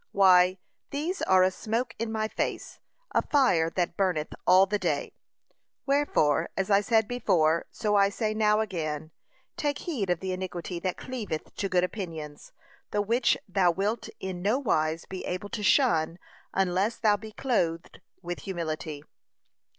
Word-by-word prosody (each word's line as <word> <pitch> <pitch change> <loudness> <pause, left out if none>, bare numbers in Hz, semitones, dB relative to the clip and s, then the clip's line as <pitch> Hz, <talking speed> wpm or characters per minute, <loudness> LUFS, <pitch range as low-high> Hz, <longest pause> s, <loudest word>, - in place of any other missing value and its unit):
Why, 185 -1 +5 0.3
these 315 +7 -3
are 185 -1 +5
a 185 - +3
smoke 230 +5 -2
in 230 0 -2
my 220 -1 -1
nose, - - -3 0.3
a - - +3
fire 190 - +3
that 175 -2 0
burneth 180 -6 0
all 185 +1 +7
the 205 +2 -1
day. - - -1 0.7
Wherefore, 275 - +2
as 195 +1 -1
I 200 0 +5
said 220 0 +2
before, 170 -9 +1
so 210 -2 -1
I 200 -1 +5
say 215 +1 -2
now 215 0 +3
again, 160 -6 -3 0.5
take 290 -1 -1
heed 245 - -3
of 175 -2 +1
the 190 +1 -3
iniquity 180 -1 -5
that 185 +1 -2
cleaveth 220 -11 -5
to 195 - -3
good 180 -1 +2
opinions; 165 -7 -6 0.4
the 210 - -1
which 235 +3 +2
thou 190 -2 +3
wilt 200 +6 -1
in 185 -2 -5
nowise 180 - +1
be 190 -1 -7
able 185 +3 -4
to 215 - -4
shun 185 - +3 0.3
unless 195 +4 +1
thou 215 -2 +3
be 220 +1 -9
clothed 175 -10 -1 0.2
with 175 0 -4
humility. 160 -5 -4
190 Hz, 155 wpm, -28 LUFS, 175-220 Hz, 0.7 s, all